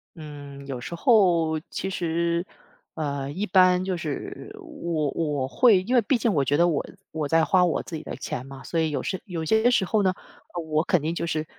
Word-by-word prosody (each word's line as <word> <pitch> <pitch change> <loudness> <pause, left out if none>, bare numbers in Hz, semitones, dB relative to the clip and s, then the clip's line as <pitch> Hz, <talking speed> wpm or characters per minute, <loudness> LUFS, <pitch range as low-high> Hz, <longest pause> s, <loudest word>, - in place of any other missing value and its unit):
嗯， 145 -3 -10
有 130 -3 -5
时 170 - -6
候， 170 - +3
其 190 - -3
实， 170 0 -1 0.5
呃， 140 -3 -3
一 195 +7 -2
般 185 -1 +4
就 185 -1 -1
是， 415 - -6
我 170 - -3
我 145 -5 -1
会 205 - +5
因 240 +7 -2
为 245 - +6
毕 240 +4 +1
竟 230 -2 +1
我 140 -3 +2
觉 145 +3 +1
得 170 +1 +4
我 155 -4 0 0.3
我 155 -2 -2
在 165 +1 +3
花 185 -2 +4
我 175 - +1
自 165 - -7
己 155 - -5
的 - - -6
钱 125 - -5
嘛。 135 0 -10
所 165 - -2
以 160 - +1
有 140 -4 -2
时 190 - -3
有 165 -4 -4
些 220 +6 +4
时 220 -6 +2
候 215 +2 +1
呢， 185 -1 +2 0.6
我 155 +1 +2
肯 175 -3 +2
定 160 +2 -1
就 170 - -3
是 155 -1 -1
170 Hz, 235 characters per minute, -25 LUFS, 150-190 Hz, 0.6 s, 为